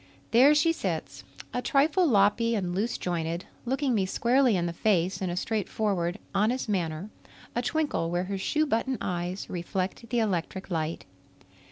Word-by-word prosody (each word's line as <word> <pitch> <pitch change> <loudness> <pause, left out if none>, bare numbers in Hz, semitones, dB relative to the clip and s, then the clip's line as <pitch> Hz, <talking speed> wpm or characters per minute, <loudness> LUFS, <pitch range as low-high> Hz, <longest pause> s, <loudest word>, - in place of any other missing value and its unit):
There 265 +6 +7
she 330 +3 +4
sits, - - -4 0.3
a 250 - -1
trifle 310 +8 +3
loppy 230 0 +3
and 180 -4 -1
loose 210 +6 -1
jointed, 170 0 -2 0.2
looking 265 +1 0
me 195 -4 +1
squarely 245 +1 +3
in 175 - 0
the 170 - -2
face 185 -1 +1
in 185 - -1
a 175 - -3
straightforward, 200 -4 -1 0.2
honest 220 +6 +1
manner, 180 -1 -2 0.4
a 240 - +1
twinkle 290 - 0
where 175 +1 0
her 195 +1 -4
shoe 310 +10 +1
button 260 -1 0
eyes 180 0 -3
reflect 185 +5 -3
the 245 - 0
electric 190 -3 -1
light. 160 - -2
205 Hz, 160 wpm, -28 LUFS, 180-245 Hz, 0.4 s, There